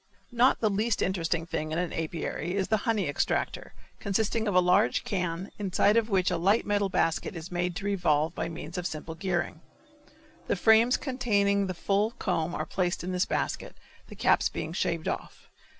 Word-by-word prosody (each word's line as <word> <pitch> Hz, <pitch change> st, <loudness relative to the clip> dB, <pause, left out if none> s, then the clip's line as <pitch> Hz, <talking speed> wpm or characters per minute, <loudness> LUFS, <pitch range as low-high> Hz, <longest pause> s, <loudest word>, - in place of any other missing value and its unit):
Not 245 Hz, +2 st, +3 dB
the 215 Hz, -, +3 dB
least 215 Hz, +3 st, 0 dB
interesting 170 Hz, -3 st, -1 dB
thing 155 Hz, -2 st, -3 dB
in 160 Hz, -, -1 dB
an 175 Hz, -1 st, -2 dB
apiary 165 Hz, +2 st, -3 dB
is 195 Hz, -2 st, -1 dB
the 220 Hz, -, +3 dB
honey 210 Hz, -6 st, +1 dB
extractor, 145 Hz, -, -2 dB, 0.2 s
consisting 220 Hz, +2 st, 0 dB
of 200 Hz, -, 0 dB
a -, -, +7 dB
large 180 Hz, -9 st, +3 dB
can 180 Hz, -1 st, -3 dB
inside 205 Hz, +1 st, +2 dB
of 230 Hz, -1 st, +2 dB
which 190 Hz, -3 st, +2 dB
a -, -, +1 dB
light 195 Hz, +7 st, +2 dB
metal 205 Hz, -1 st, +1 dB
basket 165 Hz, +1 st, 0 dB
is 165 Hz, +2 st, -7 dB
made 175 Hz, 0 st, -1 dB
to 195 Hz, -, -5 dB
revolve 165 Hz, -5 st, +1 dB
by -, -, -3 dB
means 165 Hz, +2 st, -6 dB
of 175 Hz, -, -5 dB
a -, -, +3 dB
simple 155 Hz, +1 st, -6 dB
gearing. 175 Hz, -2 st, -2 dB, 0.9 s
The -, -, +1 dB
frames 220 Hz, +5 st, +5 dB
containing 200 Hz, -7 st, +1 dB
the 185 Hz, -, -4 dB
full 205 Hz, +5 st, 0 dB
comb 175 Hz, -3 st, -1 dB
are -, -, -2 dB
placed 180 Hz, -2 st, -1 dB
in 180 Hz, -, -3 dB
this 180 Hz, 0 st, +1 dB
basket, -, -, -3 dB, 0.3 s
the -, -, -11 dB
caps -, -, +3 dB
being -, -, -5 dB
shaved -, -, -1 dB
off. -, -, -5 dB
185 Hz, 190 wpm, -28 LUFS, 170-205 Hz, 0.9 s, a